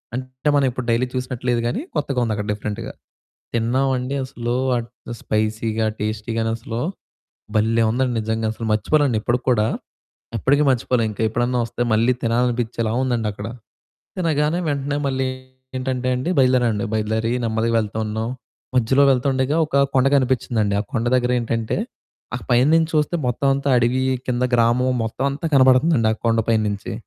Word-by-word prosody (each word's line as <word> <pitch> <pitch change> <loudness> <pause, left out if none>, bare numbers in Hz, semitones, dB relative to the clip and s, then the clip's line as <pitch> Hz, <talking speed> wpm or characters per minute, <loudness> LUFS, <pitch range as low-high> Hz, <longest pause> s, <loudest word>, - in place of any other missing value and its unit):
అంటే, 130 +3 -3
మనం 140 -1 +3
ఎప్పుడు 125 0 -5
డైలీ 120 +2 +1
చూసినట్టు 125 -1 -4
లేదు 120 -1 +1
గానీ, 120 - -2
కొత్తగా 140 -3 -1
ఉందక్కడ 105 -2 -2
డిఫరెంట్‌గా. 105 0 -5 0.6
తిన్నావండీ 130 +3 0
అసలూ 120 -2 -4 0.2
ఆహ్, 115 -1 -4 0.3
స్పైసీగా, 110 +1 -1
టేస్టీగానసలూ 115 +2 -3 0.8
భల్లే 115 +2 +3
ఉందండి 125 +2 0
నిజంగసలు. 110 +1 -2
మర్చిపోనండి 130 +3 +2
ఇప్పడికి 120 +3 -1
కూడా. 110 -3 +2 0.7
ఎప్పడికీ 140 +6 +2
మర్చిపోలే. 125 -1 +1
ఇంక 105 - -8
ఎప్పుడన్నా 120 +3 0
ఒస్తే 120 - -3
మళ్ళీ 115 +3 +3
తినాలనిపిచ్చేలా 115 -1 0
ఉందండక్కడ. 110 -5 -2 0.7
తినగానే 160 -1 +1
వెంటనే 145 0 -1
మళ్ళీ 130 0 -1 0.5
ఏంటంటే 130 0 -2
అండి, 130 +8 -2
బయలుదేరావండి. 125 -5 +3
బయలుదేరి 110 +1 0
నెమ్మదిగా 115 +1 0
వెళ్తా 110 0 -4
ఉన్నాం. 110 +1 -3 0.5
మధ్యలో 125 +3 +3
వెళ్తుండగా 130 +2 +1
ఒకా 140 -2 0 0.2
కొండ 130 0 +4
కనిపిచ్చిందండి. 120 -6 +1
ఆ - - -1
కొండ 115 -4 0
దగ్గరేంటంటే, 120 -2 0 0.6
ఆ - - -4
పైన 125 +2 +4
నించి 165 -1 +3
చూస్తే 150 +3 +1
మొత్తవంతా 135 +3 +1
అడవీ, 120 +2 +1 0.3
కింద 125 0 +1
గ్రామం, 120 +2 +3
మొత్తవంతా 140 +7 -2
కనబడతందండి. 130 -1 +5
ఆ - - -1
కొండ 115 0 +3
పైన 115 -1 +3
నించి. 100 0 -4
120 Hz, 135 wpm, -21 LUFS, 110-130 Hz, 0.8 s, కనబడతందండి